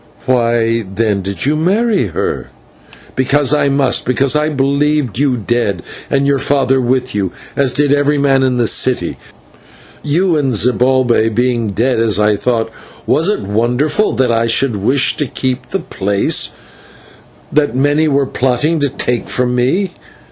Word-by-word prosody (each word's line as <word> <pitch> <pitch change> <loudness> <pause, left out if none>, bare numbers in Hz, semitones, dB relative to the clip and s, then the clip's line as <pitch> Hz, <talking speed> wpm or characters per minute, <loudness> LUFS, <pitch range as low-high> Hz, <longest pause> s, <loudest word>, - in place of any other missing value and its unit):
"Why, 115 -2 +1
then, 105 -2 0
did 100 +4 -4
you 145 +2 +1
marry 195 - +1
her?" 80 - -3 0.7
"Because 140 +2 +1
I 145 -1 +2
must, 135 -2 +2
and - - -15
because 135 +2 +2
I 150 +1 +1
believed 140 -2 0
you 135 -3 +1
dead, 105 -4 -1 0.3
and 140 0 +1
your 140 -1 +2
father 135 -1 +1
with 130 +1 -1
you, 100 -3 -1 0.2
as 140 -2 +1
did 145 -1 +2
every 145 +1 +1
man 135 -1 +2
in 130 -1 +1
the 120 - +2
city. 130 +3 +1 0.8
You 170 +4 +1
and 135 -3 0
Zibalbay 125 -1 +2
being 120 -2 0
dead, 115 +4 0
as 110 -4 +1
I 105 0 +3
thought, 115 +1 -1 0.3
was 165 +5 +1
it 210 - -1
wonderful 120 - 0
that 130 -2 +1
I 115 0 +1
should 115 +1 +1
wish 130 +7 +1
to 145 - -1
keep 130 +1 -4
the 195 - -1
place 100 - -1 1.0
that 145 -5 +1
many 145 +4 +2
were 140 -1 +1
plotting 135 +6 0
to 145 -1 0
take 125 -3 -3
from 125 -1 0
me? 155 +11 0
130 Hz, 160 wpm, -15 LUFS, 115-145 Hz, 1.0 s, I